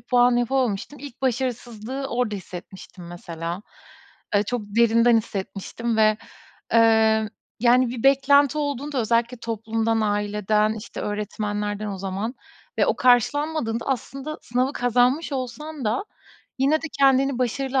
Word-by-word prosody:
puan 245 -1 +3
yapamamıştım. 245 +1 -1
İlk 280 -2 -10
başarısızlığı 250 0 -2
orada 240 -3 -1
hissetmiştim 180 0 -10
mesela. 170 +1 -6 0.7
E, 205 - +4
çok 245 +3 -2
derinden 230 +2 +4
hissetmiştim 220 +2 -4
ve, 215 -1 +4 0.6
eee, 220 -1 +4 0.3
yani, 250 +1 +4
bir 240 -2 -5
beklenti 280 +1 +4
olduğunda 285 -1 -2
özellikle 235 +2 +1
toplumdan, 225 0 -1
aileden, 210 0 +1
işte, 220 +1 -8
öğretmenlerden 210 0 -3
o 195 -2 -5
zaman 195 +6 -3 0.4
ve - - +4
o - - +1
karşılanmadığında 245 0 +2
aslında 275 +3 -4
sınavı 255 +3 0
kazanmış 250 +5 +1
olsan 270 +2 -5
da 225 - 0 0.5
yine 275 +3 +3
de 325 - -3
kendini 270 -1 +4
başarılı 265 +2 0
235 Hz, 120 wpm, -23 LUFS, 215-265 Hz, 0.7 s, E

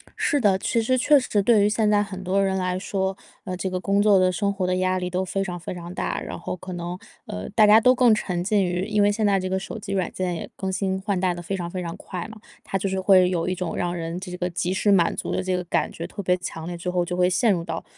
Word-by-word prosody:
是 290 - +1
的， 205 -6 +3
其 230 +4 0
实 255 +3 +1
确 290 +3 +5
实 210 -6 0
对 215 -3 +4
于 - - +3
现 215 0 +1
在 205 -1 +4
很 190 -2 -5
多 190 +2 +1
人 195 -1 +1
来 185 0 -1
说， 190 0 -2 0.3
呃， 185 -2 -5
这 190 - -2
个 185 - -2
工 200 +2 +1
作 205 -1 +5
的 185 0 +3
生 200 +2 0
活 195 -2 -2
的 180 0 0
压 185 0 +1
力 180 -1 -3
都 185 +1 -1
非 195 +2 -2
常 180 -2 -5
非 170 - -6
常 175 0 -8
大， - - -2
然 - - -6
后 - - -4
可 185 +1 -9
能， 175 0 -5 0.3
呃， 90 +1 -6
大 215 0 +4
家 215 +2 +7
都 255 +3 +6
更 245 -3 +5
沉 180 -4 -2
浸 200 +2 +2
于 180 +1 -1
因 210 -1 +1
为 205 - +4
现 215 +1 0
在 200 -1 +3
这 185 - -3
个 190 - 0
手 195 - -7
机 205 -2 -7
软 190 -3 0
件 185 -1 -2
也 170 - -6
更 190 -1 -3
新 190 0 -1
换 200 -2 -1
代 180 -1 +1
得 175 - -7
非 190 +3 -3
常 175 -2 -4
非 180 +1 -4
常 170 0 -5
快 180 -3 -6
嘛， 220 - -11 0.3
它 195 - -2
就 195 +1 -2
是 190 - -2
会 185 -2 +5
有 170 -2 -1
一 - - 0
种 180 -1 -4
让 175 0 -1
人 165 0 -4
这 185 0 -7
个 180 0 -2
及 180 +1 -2
时 205 +2 +1
满 170 -3 +3
足 - - -4
的 185 - -1
这 185 -1 0
个 180 - -3
感 - - 0
觉 165 - -6
特 200 - -7
别 180 0 +2
强 165 -2 -6
烈， 175 0 -5
最 170 +1 -4
后 180 0 +1
就 180 +1 -4
会 180 0 +3
陷 220 +5 +3
入 170 -3 -1
到 165 0 -4
185 Hz, 325 characters per minute, -24 LUFS, 180-200 Hz, 0.3 s, 家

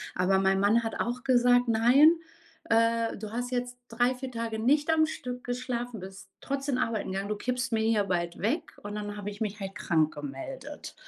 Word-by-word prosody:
Aber 185 +2 +3
mein 190 0 +2
Mann 215 +4 +3
hat 225 - -4
auch 240 +1 -2
gesagt: 245 -1 +4
„Nein, 245 +8 +6 0.5
äh, 230 0 +2
du 210 0 -7
hast 245 +2 -3
jetzt 245 0 -2
3, 245 +2 +1
4 260 +1 -6
Tage 230 -2 -3
nicht 290 +7 +3
am 315 -1 +4
Stück 250 -5 -6
geschlafen, 245 -2 -3
bist 190 +1 -10
trotzdem 275 -1 -2
arbeiten 230 -5 -1
gegangen. 195 +1 -3
Du 210 - 0
kippst 250 +3 -2
mir 225 - +1
hier 220 -2 +2
bald 175 -2 -2
weg.“ 215 +4 -2
Und 205 0 -6
dann 205 0 -5
habe 205 0 -5
ich 205 - -12
mich 210 -1 -2
halt 195 -1 -5
krankgemeldet. 160 - -3
230 Hz, 190 wpm, -28 LUFS, 205-250 Hz, 0.5 s, Nein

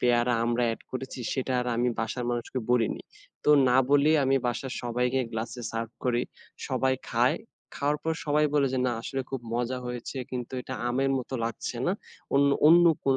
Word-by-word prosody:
পেয়ারা, 120 0 +3
আমড়া 120 +1 +1
অ্যাড 115 - -3
করেছি 130 0 -5
সেটা 130 -1 -1
আর 125 - -3
আমি 120 +1 +2
বাসার 115 +2 -2
মানুষকে 120 +2 -3
বলিনি, 120 -3 +2 0.4
তো - - +5 0.2
না 125 - +4
বলেই 145 +2 +5
আমি 135 +1 +3
বাসার 125 +2 -2
সবাইকে 125 +2 0
গ্লাসে 115 +2 -4
সার্ভ 115 0 -3
করি, 120 -1 +2 0.5
সবাই 130 0 +1 0.2
খায়, 120 +2 +3 0.4
খাওয়ার 145 +1 0
পর 160 +1 0
সবাই 150 0 +3
বলে 145 -2 +4
যে, 130 - 0
"না 120 - +1
আসলে 135 +3 -3
খুব 135 - -3
মজা 120 +2 -1
হয়েছে 125 +2 -5
কিন্তু 125 -1 -5
এটা 130 - -6
আমের 135 +3 +1
মতো 130 +1 -6
লাগছে 115 +1 -4
না 180 - +3 0.4
অন্য 140 +1 +5 0.2
অন্য 170 +2 +8 0.2
কোন 135 -1 +3
125 Hz, 180 wpm, -28 LUFS, 120-135 Hz, 0.5 s, অন্য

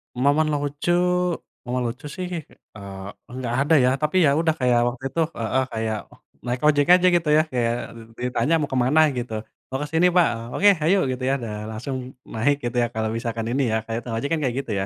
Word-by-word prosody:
Momen 145 +5 +2
lucu 145 +3 -1 0.8
momen 125 0 -1
lucu 135 +5 -14
sih, 185 -1 -4 0.5
eee, 100 +4 -10
nggak 125 -2 -3
ada 155 +3 +3
ya. 125 - +4
Tapi, 150 +4 -1
ya - - +5
udah 160 -1 +2
kayak 125 -2 +3
waktu 120 +2 -5
itu 165 - -3 0.2
heeh, 125 +4 0
kayak, 110 -1 -1
oh - - -18 0.3
naik 125 +1 -2
ojek 145 -1 +3
aja 185 0 +5
gitu 165 -3 +1
ya, - - +6
kayak 120 -2 +1 0.2
dit 115 0 -13 0.2
ditanya, 165 - +1
"Mau 145 - -2
ke - - +1
mana?" 150 +5 +3 0.2
Gitu, 120 -2 -4 0.4
"Mau 130 - -2
ke - - -4
sini 170 +2 +4
Pak! 175 - +6 0.3
Oke 205 +1 +5
hayu!" 180 +6 +3
Gitu 130 0 -5
ya, 135 - +2
dan 105 -1 -5
langsung 125 +5 -5 0.4
naik 140 +6 +2
gitu 120 0 -2
ya, - - +1
kalau 110 0 -1
misalkan 115 -1 -3
ini 135 +2 +1
ya, - - +2
kayak 115 +1 -3
tukang 115 -2 -4
ojek 140 - -2
kan 165 - +1
kayak 125 -2 0
gitu 120 - -5
ya. 95 - -1
130 Hz, 220 wpm, -23 LUFS, 115-150 Hz, 0.8 s, ya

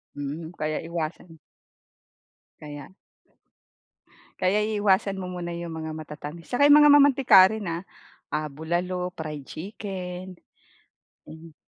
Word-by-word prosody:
Hmm, 150 +4 -5
kaya 155 0 -1
iwasan. 165 0 -5 1.2
Kaya. 145 +2 -9 1.5
Kaya 190 +3 +2
iiwasan 200 -2 +1
mo 180 - -5
muna 175 -1 -5
yung 170 -1 -6
mga 160 0 -5
matatamis, 150 +2 -9
saka 270 +3 +3
yung 290 +1 +8
mga 295 -1 +7
mamantika 275 -7 +6
rin, 220 -2 -5
ah. 180 - -8 0.5
Ah, 155 0 -1
bulalo, 175 +3 -2 0.2
fried 150 -3 -6
chicken. 185 -1 -7 0.9
Hmm. 160 0 -12
175 Hz, 115 wpm, -25 LUFS, 155-195 Hz, 1.5 s, yung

